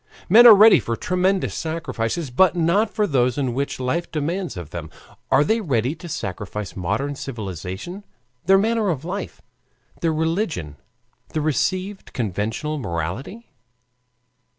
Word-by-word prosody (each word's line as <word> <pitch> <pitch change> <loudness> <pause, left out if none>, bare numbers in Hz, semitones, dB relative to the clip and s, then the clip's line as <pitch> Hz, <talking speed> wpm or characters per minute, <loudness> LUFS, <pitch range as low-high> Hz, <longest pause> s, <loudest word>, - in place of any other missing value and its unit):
Men 235 +6 +8
are 225 - +11
ready 215 +2 +8
for 115 - -3
tremendous 185 +6 0
sacrifices, 160 -3 -3
but 180 +7 +4
not 175 +6 +2
for 210 - 0
those 125 - +1
which 135 0 -2
life 145 +7 -2
demands 170 - -3
of 85 -3 -8
them. 80 -2 -6 0.4
Are 135 +2 +5
they 220 +6 +1
ready 130 - 0
to 170 +1 -10
sacrifice 100 - -5
modern 105 +10 -2
civilization, 110 - -6 0.4
their 195 0 +7
manner 220 0 +1
of 160 -3 -2
life, 195 +4 -5 0.6
their 165 - +1
religion, 160 - -2 0.6
the 155 - 0
received 185 +6 -2
conventional 115 - -2
morality? 105 - -5
150 Hz, 130 wpm, -22 LUFS, 115-185 Hz, 0.6 s, are